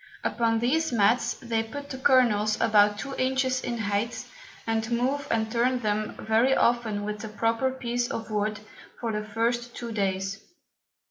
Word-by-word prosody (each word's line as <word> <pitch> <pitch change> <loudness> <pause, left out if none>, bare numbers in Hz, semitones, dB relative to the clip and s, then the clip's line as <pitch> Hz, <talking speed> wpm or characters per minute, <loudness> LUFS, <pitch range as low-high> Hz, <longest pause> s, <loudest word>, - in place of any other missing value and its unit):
Upon 230 -1 +1
these 285 +7 +1
Mats 225 +1 +2
they 230 -3 -2
put 280 +6 -7
the 260 - -5
Kernels 225 -6 +3
about 210 -2 +4
two 270 +5 -5
Inches 260 0 +1
in 240 -1 -2
height 210 +2 -2 0.4
and 225 0 -1
move 260 +4 0
and 220 -1 0
turn 245 +2 +2
them 215 -1 -1
very 230 +5 +3
often 225 -4 +1
with 210 0 -4
a 220 - -5
proper 225 +4 0
Piece 245 -2 -2
of 225 -1 -5
Wood 210 0 -1 0.4
for 230 -2 -2
the 210 0 -2
first 235 +3 -1
two 235 -1 -6
Days. 195 -1 -2
230 Hz, 160 wpm, -27 LUFS, 215-245 Hz, 0.4 s, about